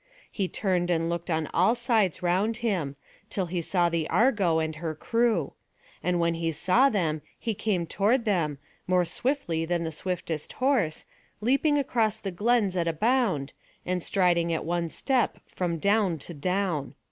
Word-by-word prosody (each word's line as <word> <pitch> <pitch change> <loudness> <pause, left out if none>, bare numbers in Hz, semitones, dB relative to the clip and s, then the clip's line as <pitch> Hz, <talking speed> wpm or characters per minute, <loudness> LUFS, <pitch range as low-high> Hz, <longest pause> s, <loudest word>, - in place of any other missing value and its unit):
He 195 -4 -1
turned 180 -2 0
and 165 -1 +1
looked 170 +1 -4
on 160 -1 0
all 190 +7 +4
sides 220 -7 +1
round 195 +6 +1
him, 170 -11 -1 0.3
till 190 - -1
he 175 0 -2
saw 175 +1 +2
the 165 -2 -1
Argo 210 -9 +3
and 160 -1 -1
her 160 -1 -4
crew; 230 +7 0 0.5
and 180 -1 0
when 170 0 +2
he 165 0 -1
saw 185 - +3
them 165 - 0 0.2
he 230 - -2
came 195 -4 -1
toward 225 +8 +1
them, 165 -9 0 0.3
more 180 -1 +3
swiftly 210 - -1
than 170 +1 -1
the 160 - -3
swiftest 165 -2 -4
horse, 255 - +1 0.3
leaping 275 +7 +2
across 225 -6 +1
the 195 -3 -4
glens 205 0 +1
at 170 -2 0
a 165 - +1
bound, 210 - +1 0.3
and 180 0 -1
striding 170 -2 +2
at 160 - -2
one 170 0 -1
step 260 - 0
from 175 -2 -2
down 200 -1 +2
to 165 +4 -7
down. 180 -2 -1
180 Hz, 170 wpm, -27 LUFS, 165-220 Hz, 0.5 s, all